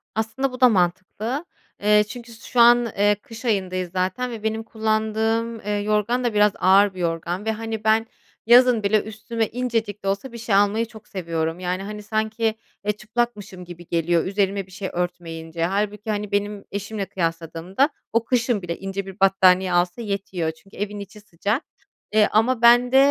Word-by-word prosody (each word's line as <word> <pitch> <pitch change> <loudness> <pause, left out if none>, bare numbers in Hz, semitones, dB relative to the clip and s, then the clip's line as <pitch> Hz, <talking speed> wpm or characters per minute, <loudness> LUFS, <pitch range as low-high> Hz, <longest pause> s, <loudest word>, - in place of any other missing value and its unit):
Aslında 225 +5 -1
bu 255 +1 -9
da 255 - +8
mantıklı. 200 - -1 0.4
Eee, 210 0 +5
çünkü 235 +1 -9
su 225 - -13
şu 245 - 0
an, 240 0 +7
eee, 205 +1 +4
kış 225 +3 -12
ayındayız 185 -5 -1
zaten 190 +7 -1
ve 225 -2 -7
benim 220 0 -1
kullandığım, 220 +1 -1
eee, 210 - -7
yorgan 210 +4 0
da 240 - 0
biraz 210 0 +4
ağır 195 +2 +5
bir 185 - -10
yorgan 170 +3 -2
ve, 220 - +1
hani, 220 0 -5
ben 220 +1 +3 0.4
yazın 240 -1 +6
bile 205 +1 +3
üstüme 220 +1 -3
incecik 225 -4 -2
de - - -3
olsa 200 +7 -2
bir 235 - -8
şey 225 -3 0
almayı 205 +3 +3
çok 220 -1 -15
seviyorum. 165 -2 -3
Yani, 185 +1 -2
hani, 210 +1 -7
sanki, 220 +1 -1 0.3
eee, 210 - +2
çıplakmışım 210 -3 -4
gibi 175 -1 -11
geliyor, 170 0 +1
üzerime 195 0 0
bir - - -19
şey 190 +1 -5
örtmeyince. 165 -2 -3
Hâlbuki, 210 +3 -2
hani, 210 -1 -2
benim 205 0 -2
eşimle 200 0 -4
kıyasladığımda 170 - -1 0.2
o 230 0 +3
kışın 235 -4 +1
bile 170 -1 -4
ince 195 0 -4
bir 195 +1 -10
battaniye 190 -1 +4
alsa 175 +5 +1
yetiyor. 195 -6 -2
Çünkü 195 +5 -19
evin 205 +1 -4
içi 200 +1 -10
sıcak, 205 - -2 0.5
eee, 215 -1 +5
ama 230 +2 +2
ben 245 +1 +6
de, 265 - +5
210 Hz, 180 wpm, -23 LUFS, 185-225 Hz, 0.5 s, da